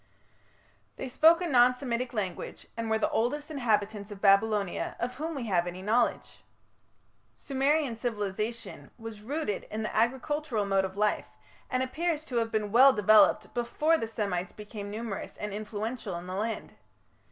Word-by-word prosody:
They 265 - -5
spoke 320 +7 +5
a 355 - -1
non 250 -3 +5
Semitic 250 -1 -3
language, 195 -6 -4
and 230 -1 -3
were 220 - +3
the 220 - 0
oldest 290 +7 -1
inhabitants 215 -6 0
of 205 -2 -9
Babylonia 200 -1 +2
of 245 +1 -2
whom 315 +4 -4
we 260 -4 -4
have 180 -5 +1
any 180 +1 -6
knowledge. 230 +4 0 0.9
Sumerian 275 -1 +1
civilization 220 0 -4
was 225 -2 -8
rooted 255 -3 -3
in 220 +1 -3
the 215 - -4
agricultural 255 0 0
mode 195 -1 +2
of 190 +1 -7
life, 210 0 +1 0.4
and 255 0 +1
appears 310 +3 -2
to 250 - -3
have 225 -1 0
been 210 -2 -1
well 260 +4 +7
developed 215 0 +4
before 295 +7 +1
the 225 -8 -2
Semites 200 -5 -2
became 210 -1 -8
numerous 215 -1 -5
and 210 -1 -5
influential 215 0 -4
in 170 +1 -6
the 185 - -6
land. 220 +4 -3
225 Hz, 160 wpm, -29 LUFS, 205-255 Hz, 0.9 s, well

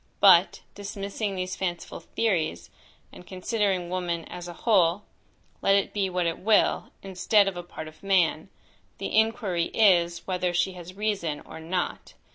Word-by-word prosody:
But, 190 -2 +6
dismissing 200 0 -4
these 185 0 -3
fanciful 175 -2 -4
theories, 160 - -2 0.4
and 180 - -13
considering 190 -2 -1
woman 175 -2 -2
as 175 0 -8
a 175 - -7
whole, 195 -3 +3 0.6
let 195 - +4
it 200 - 0
be 195 -2 0
what 180 -1 -1
it 165 -1 -1
will, 215 +1 +2
instead 195 +2 +2
of 195 - -2
a 175 - -4
part 165 -2 -9
of 155 - -14
man, 190 -4 +1 0.5
the - - -4
inquiry 215 -6 +2
is, 175 -5 +3
whether 180 -1 -1
she 175 +2 +1
has 180 0 -10
reason 195 -8 -2
or - - -11
not. 175 +3 -4
185 Hz, 155 wpm, -26 LUFS, 175-200 Hz, 0.6 s, But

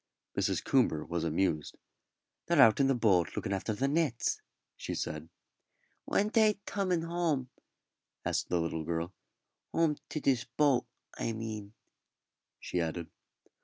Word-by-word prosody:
Mrs. - - 0
Coomber 75 -1 +2
was 85 -1 -2
amused. 80 -1 0 0.7
"They're 170 -3 +3
out 115 -3 +7
in 135 - +5
the 135 - +3
boat 95 -9 +3
looking 100 - -2
after 100 +3 -1
the 120 +6 0
nets," 145 -5 +1 0.3
she - - -4
said. 75 +1 -4 0.8
"When 205 +1 +2
they 215 -1 +4
toming 185 -4 0
home?" 165 -7 -1 0.7
asked - - 0
the 90 - +2
little 80 -1 -2
girl; 85 +3 -2 0.6
"home 160 -3 +2
to 155 - -2
dis 130 -4 +2
boat, 135 -5 +3 0.3
I 115 - -1
mean," 110 -2 -5 0.9
she 90 - -2
added. 85 0 -3
115 Hz, 135 wpm, -31 LUFS, -, 0.9 s, out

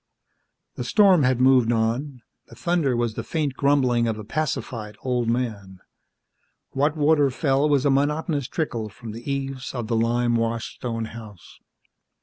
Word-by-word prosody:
The - - -3
storm 195 -6 +5
had 130 -2 +2
moved 130 -2 +4
on; 120 +3 -1 0.2
the - - -14
thunder 170 -8 0
was 120 -2 0
the - - -5
faint 150 -4 -2
grumbling 130 -4 +2
of 110 -1 -1
a 110 - -7
pacified 115 -5 -4
old 125 -2 0
man. 110 -6 -3 0.9
What 145 +3 0
water 150 -1 +3
fell 135 +2 +1
was 145 -1 +2
a 140 - +4
monotonous 145 0 0
trickle 115 -9 -3
from 110 +2 -10
the 120 +6 -6
eaves 135 -1 -4
of 120 -2 -3
the 115 +1 -1
lime 120 +1 +1
washed 115 0 -2
stone 115 -3 -3
house. 110 -5 -12
125 Hz, 155 wpm, -24 LUFS, 115-145 Hz, 0.9 s, storm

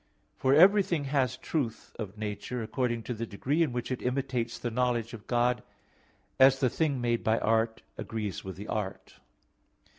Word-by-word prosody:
For 130 +1 +3
everything 185 -2 +5
has 135 -3 0
truth 130 -5 -3
of 105 -2 -5
nature 110 +3 -4
according 120 0 -1
to 125 - -3
the 115 0 -4
degree 135 +10 -1
in 155 -6 +2
which 120 +1 -3
it 130 - -2
imitates 125 -2 -1
the 120 - -3
knowledge 120 -1 0
of 110 -3 -10
God, 120 0 +2 0.8
as 135 0 +7
the 130 -3 +2
thing 150 -5 0
made 120 -1 0
by 110 +1 +3
art 110 0 +1 0.2
agrees 105 -3 -4
with 95 -1 -6
the 100 +3 -8
art. 105 -3 -4
120 Hz, 170 wpm, -29 LUFS, 110-135 Hz, 0.8 s, as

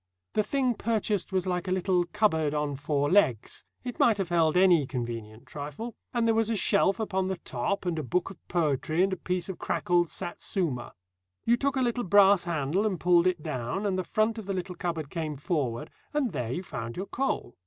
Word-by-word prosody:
The - - +3
thing 255 +2 +1
purchased 215 -3 -1
was 185 -1 0
like 180 0 -2
a - - -1
little 185 -1 +2
cupboard 160 -6 +1
on 150 -1 -1
four 145 0 0
legs; 145 - +2 0.2
it 245 -1 -6
might 225 -3 +5
have 195 -3 -2
held 165 -1 +3
any 175 -7 +5
convenient 115 -2 -5
trifle; 150 - -6 0.2
and 235 -2 +1
there 225 - +4
was 225 0 +2
a 225 - +1
shelf 200 0 +2
upon 190 -4 -1
the 190 -1 -2
top 170 +6 -3
and 170 -3 -1
a - - -3
book 180 +8 -1
of 190 - -16
poetry 160 0 +1
and 195 0 +1
a - - 0
piece 180 -1 -2
of 190 - -6
crackled 175 -1 +1
Satsuma. 175 - -3 0.5
You 235 - +5
took 275 +3 0
a 260 - +2
little 245 0 0
brass 200 -1 +5
handle 165 +3 0
and 190 -5 -2
pulled 175 0 +4
it 175 -4 0
down, 130 - -3
and 195 -2 +1
the 185 - -1
front 215 +4 0
of 210 - -9
the 195 - -1
little 185 0 -3
cupboard 165 -4 -4
came 155 -3 -3
forward, 140 -7 -2 0.2
and 275 -6 +1
there 125 -7 -3
you 175 +8 -3
found 115 -9 -6
your 190 - -3
coal. 260 - -2
180 Hz, 210 wpm, -28 LUFS, 150-200 Hz, 0.5 s, might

